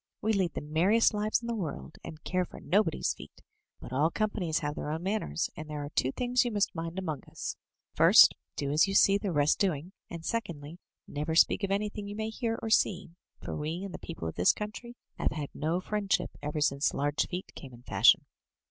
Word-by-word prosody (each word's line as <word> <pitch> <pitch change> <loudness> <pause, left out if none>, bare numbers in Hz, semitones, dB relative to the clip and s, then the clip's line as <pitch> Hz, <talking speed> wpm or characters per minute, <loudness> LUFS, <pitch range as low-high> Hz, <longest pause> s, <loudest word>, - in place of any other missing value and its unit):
"We 220 +1 +1
lead 185 -5 0
the - - -3
merriest 175 +11 +3
lives 215 +2 0
in - - -5
the 235 - -1
world, 150 - -5
and 155 -1 -9
care 185 0 0
for - - -10
nobody's 180 -1 +1
feet; - - -14 0.4
but 125 - -9
all 145 +5 +3
companies 190 -5 -1
have 150 -3 -2
their 150 - -5
own 160 +3 -3
manners, 190 - -1
and 155 0 -8
there 150 -1 -4
are 145 - -8
two 130 - +1
things 245 - +1
you 240 - -2
must 205 -2 +1
mind 165 +1 -5
among 160 -7 -3
us: - - -5 0.4
first, - - +8 0.2
do 140 -1 -2
as 155 +6 +4
you 195 - -2
see 200 0 +5
the 200 -2 -2
rest 145 -1 +2
doing; 180 -3 0 0.2
and 165 -1 -7
secondly, 170 -8 -4 0.3
never 150 +2 -3
speak 195 - +4
of 195 - 0
anything 205 +1 -2
you 205 - -6
may 220 +1 -3
hear 225 0 -2
or 225 - -3
see, 190 -6 +2 0.3
for - - -4
we 160 +5 -3
and 195 - -6
the - - -6
people 165 - -6
of 80 - -4
this 90 - +4
country 220 +3 -7 0.2
have - - 0
had 145 -2 -4
no 160 +4 -1
friend 200 +1 -4
ship - - +2
ever 150 +1 -3
since 140 0 +1
large 145 +1 0
feet 180 +1 -6
came 135 - -10
in 120 0 -14
fashion.' - - +5
170 Hz, 220 wpm, -30 LUFS, 150-210 Hz, 0.4 s, first